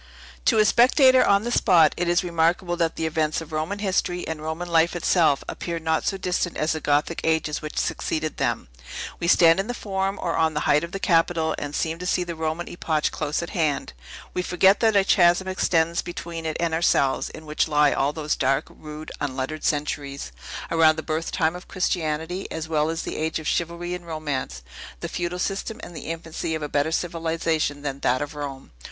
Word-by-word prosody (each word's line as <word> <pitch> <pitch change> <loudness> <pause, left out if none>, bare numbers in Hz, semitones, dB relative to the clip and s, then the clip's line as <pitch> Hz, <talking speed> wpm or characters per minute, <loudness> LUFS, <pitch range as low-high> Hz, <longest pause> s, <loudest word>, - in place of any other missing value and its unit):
To - - +4
a 215 - +5
spectator 255 +4 +6
on 200 +1 +3
the 240 - -2
spot, 170 -10 +5
it 175 - -1
is 175 +2 +3
remarkable 175 +1 +1
that 165 -1 0
the 160 - -2
events 155 -1 0
of 165 -1 -9
Roman 155 +6 -2
history, 185 -3 -1
and 160 -1 -4
Roman 160 +3 -4
life 170 0 +3
itself, 165 -4 +2
appear 170 -1 -4
not 160 -1 -1
so 195 - 0
distant 180 -2 -1
as 155 - +1
the 160 - -1
Gothic 145 +3 0
ages 160 -2 0
which 155 - -7
succeeded 155 -1 -2
them. - - -1 0.5
We 170 - -2
stand 165 0 +6
in 195 - -1
the 245 - -3
Forum, 195 -2 -2
or 170 - -1
on 160 -1 +1
the 150 - 0
height 150 +2 +3
of 170 - -5
the 195 - -4
Capitol, 165 -3 +2
and 145 0 -5
seem 165 0 -1
to 180 - -4
see 180 - +1
the 175 -1 -5
Roman 160 +1 -3
epoch 155 -3 -1
close 150 +2 -2
at 170 - -7
hand. 155 - -1 0.4
We 180 - 0
forget 190 +2 +4
that 220 -2 +3
a 200 - +5
chasm 175 -1 +4
extends 170 -3 +1
between 170 -2 -6
it 155 - -2
and 170 -1 0
ourselves, 160 -5 +2
in 160 - -11
which 150 +1 0
lie 150 -1 +4
all 140 +1 +1
those 150 0 -2
dark, 135 +1 +1
rude, 155 0 -9
unlettered 140 +2 -3
centuries, 145 - -2 0.4
around 160 -1 +5
the 160 - -5
birth 160 +1 -2
time 160 -1 +1
of 180 - -10
Christianity, 175 -1 -2
as 160 0 -4
well 155 -1 +1
as 165 0 -3
the - - -5
age 160 +1 -1
of 160 - -7
chivalry 170 +1 -1
and 175 -1 -7
romance, 145 - -4 0.4
the - - -4
feudal 175 0 -3
system, 200 +4 -3
and 175 - -9
the - - -7
infancy 165 0 -4
of 155 - -4
a - - -2
better 145 +2 +1
civilization 165 -3 -1
than 140 -1 -3
that 130 +1 +1
of 145 +2 -7
Rome. 140 -2 -7
165 Hz, 210 wpm, -24 LUFS, 155-175 Hz, 0.5 s, spectator